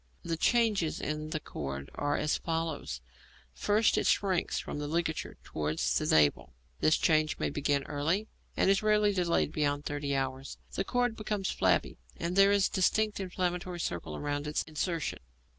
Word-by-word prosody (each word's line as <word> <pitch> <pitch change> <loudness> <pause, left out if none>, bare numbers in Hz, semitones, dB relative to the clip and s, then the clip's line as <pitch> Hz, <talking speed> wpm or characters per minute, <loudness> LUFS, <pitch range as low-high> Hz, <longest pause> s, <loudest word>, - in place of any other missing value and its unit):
The 165 - -1
changes 210 -3 +2
in 155 +1 -3
the 155 - -2
cord 70 - -6
are 145 0 0
as 150 - +1
follows: 160 - -3 0.5
First 210 - +2
it - - 0
shrinks 190 -4 +1
from - - -4
the 145 - -3
ligature 160 +1 -2
towards 75 +1 -1
the - - +1
navel; 75 -5 +3 0.2
this 155 - +4
change 155 -2 +2
may - - -1
begin 145 -1 0
early, 160 +10 -1 0.3
and - - +3
is 195 - +3
rarely 210 -1 +3
delayed 175 -5 +1
beyond 145 -1 0
thirty 145 -1 -2
hours; 135 0 -3 0.2
the - - 0
cord 245 +1 0
becomes 210 -3 -2
flabby, - - +1 0.2
and 170 +2 -2
there 195 0 +6
is 200 -1 +4
a - - -12
distinct 210 +3 +2
inflammatory 180 -1 -2
circle 85 - -3
round 145 0 -2
its 150 - 0
insertion. 165 +1 -2
160 Hz, 165 wpm, -30 LUFS, 145-195 Hz, 0.5 s, there